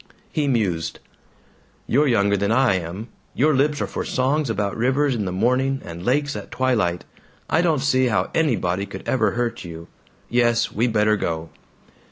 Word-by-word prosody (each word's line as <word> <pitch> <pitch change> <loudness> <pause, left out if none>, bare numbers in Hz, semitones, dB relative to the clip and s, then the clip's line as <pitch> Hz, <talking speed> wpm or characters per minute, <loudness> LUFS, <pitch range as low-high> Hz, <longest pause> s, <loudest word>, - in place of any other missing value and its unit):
He 150 -2 0
mused, 100 -11 0 0.9
"You're 145 +5 +2
younger 100 -5 +3
than 100 +1 0
I 130 -1 +4
am. 95 +5 -4 0.3
Your 150 +4 +3
lips 145 +2 +1
are - - +1
for - - -4
songs 135 +2 0
about 100 -2 -1
rivers 135 +4 +1
in 110 -4 -2
the 90 - -2
morning 125 +7 +1
and 85 +1 -8
lakes 145 +5 +1
at - - -7
twilight. 110 -10 0 0.4
I 165 - +2
don't 160 -6 +1
see 130 -2 +3
how 110 - 0
anybody 100 - 0
could - - -9
ever 110 -6 +1
hurt 120 -1 -2
you.... 85 -1 -9 0.4
Yes. 120 -1 +2
We 115 +4 +1
better 105 -2 +2
go." 80 -3 -3
120 Hz, 170 wpm, -22 LUFS, 100-135 Hz, 0.9 s, I